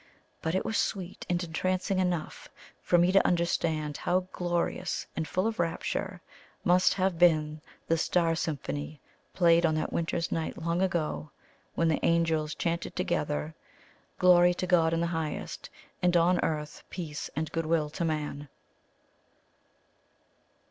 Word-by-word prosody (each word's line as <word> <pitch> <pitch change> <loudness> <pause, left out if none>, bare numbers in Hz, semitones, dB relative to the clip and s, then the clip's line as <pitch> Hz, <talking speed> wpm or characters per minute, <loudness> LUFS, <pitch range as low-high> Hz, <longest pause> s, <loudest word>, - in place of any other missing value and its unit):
But 160 +2 -1
it 190 - 0
was 220 - 0
sweet 190 -2 -3
and 175 0 0
entrancing 185 +3 -1
enough 180 -4 -2 0.3
for 175 - +3
me 175 +1 +4
to 195 - +5
understand 165 -4 0
how 180 +1 +1
glorious 175 -1 -2
and 160 -1 -2
full 185 +6 0
of 225 -3 -2
rapture 175 +2 -2 0.4
must 180 +1 +4
have 185 -3 0
been 155 -3 +3 0.2
the 165 0 +1
star 165 0 +2
symphony 150 -1 -4 0.4
played 170 -1 +5
on 160 -2 +3
that 155 - -2
winter's 165 0 -1
night 160 -1 -2
long 170 +2 -1
ago, 170 -4 -1 0.5
when 165 - +2
the 160 - 0
angels 160 -2 +1
chanted 170 0 -2
together, 75 +2 -1 0.6
"Glory 180 -1 +6
to 185 - -2
God 170 -3 +3
in 165 0 0
the - - +1
highest, 160 -2 -4 0.3
and 180 -1 +4
on 175 +2 +3
earth 150 -1 -3
peace 155 -5 -5
and 155 +1 -2
good 165 -1 -2
will 155 -2 +1
to 170 - -3
Man!" 150 -3 -3
170 Hz, 145 wpm, -29 LUFS, 155-180 Hz, 0.6 s, Glory